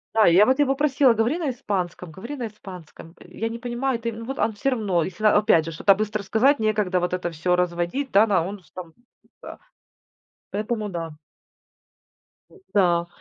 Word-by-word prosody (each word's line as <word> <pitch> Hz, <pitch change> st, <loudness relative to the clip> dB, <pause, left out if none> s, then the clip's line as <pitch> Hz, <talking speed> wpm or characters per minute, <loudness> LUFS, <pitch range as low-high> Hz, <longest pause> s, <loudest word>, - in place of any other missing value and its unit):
Да, 215 Hz, -5 st, +6 dB
и -, -, +3 dB
я 200 Hz, +5 st, +7 dB
вот 260 Hz, +2 st, +1 dB
его 275 Hz, -1 st, +2 dB
просила: 270 Hz, -3 st, +3 dB
"Говори 230 Hz, +9 st, 0 dB
на 315 Hz, -6 st, -2 dB
испанском, 185 Hz, -7 st, -4 dB
говори 235 Hz, -, -8 dB
на 240 Hz, -, -3 dB
испанском". 180 Hz, -5 st, -12 dB
Я 220 Hz, +6 st, -5 dB
не 230 Hz, +1 st, -7 dB
понимаю 245 Hz, 0 st, -2 dB
ты, 230 Hz, -1 st, -4 dB
но 230 Hz, +1 st, -8 dB
вот 270 Hz, +3 st, -6 dB
он 220 Hz, -, +1 dB
всё 205 Hz, +7 st, -1 dB
равно, 205 Hz, -10 st, 0 dB
если, 200 Hz, +5 st, -5 dB
а, 215 Hz, -, +5 dB
опять 170 Hz, -6 st, +3 dB
же, 165 Hz, -, -5 dB
что-то 195 Hz, +5 st, +4 dB
быстро 215 Hz, 0 st, -3 dB
сказать, 255 Hz, +9 st, +3 dB
некогда 210 Hz, -4 st, 0 dB
вот 180 Hz, 0 st, -2 dB
это 175 Hz, -1 st, -2 dB
всё 180 Hz, +3 st, 0 dB
разводить, 180 Hz, +10 st, -2 dB
да, 205 Hz, +3 st, +5 dB
на 195 Hz, -5 st, +2 dB
он 200 Hz, -1 st, -8 dB
с 155 Hz, -, -26 dB
там, 170 Hz, -3 st, -10 dB, 0.5 s
да -, -, -10 dB, 0.9 s
Поэтому 215 Hz, +1 st, -3 dB
да. 170 Hz, -3 st, -5 dB, 1.4 s
М-да. 180 Hz, -, 0 dB
210 Hz, 190 wpm, -23 LUFS, 180-240 Hz, 1.4 s, я